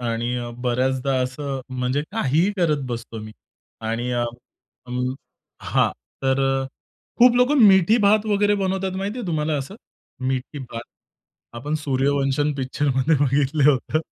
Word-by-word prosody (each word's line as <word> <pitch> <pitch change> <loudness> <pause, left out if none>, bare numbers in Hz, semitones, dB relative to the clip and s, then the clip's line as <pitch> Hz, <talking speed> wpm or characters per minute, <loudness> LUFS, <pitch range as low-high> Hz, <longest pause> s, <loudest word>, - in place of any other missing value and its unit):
आणि 120 0 -2
अ, 120 -1 -4 0.2
बऱ्याचदा 130 +2 0
असं 135 +1 -4 0.2
म्हणजे 125 +3 0
काहीही 180 - +1
करत 155 -6 +1
बसतो 115 -1 -6
मी 110 0 -9 0.5
आणि 115 +2 -2
अ, 120 0 0 0.6
अं 125 +1 -2 0.5
हां, - - +2 0.3
तर 135 0 +2 0.2
अ, - - -4 0.5
खूप 240 0 +7
लोकं 260 +4 +4
मिठी 190 +3 +5
भात 210 +1 +4
वगैरे 205 0 +2
बनवतात 190 0 -1
माहिती 200 +5 -3
आहे 225 - -5
तुम्हाला 155 -2 0
असं? 135 +8 -6 0.5
मीठी 135 +2 -3
भात? 120 -3 -7 0.7
आपण 145 +6 -4
सूर्यवंशम 140 +1 +1
पिक्चरमध्ये 135 +2 +1
बघितलं 140 +2 +3
होतं. 145 +3 -1
140 Hz, 135 wpm, -22 LUFS, 125-175 Hz, 0.7 s, खूप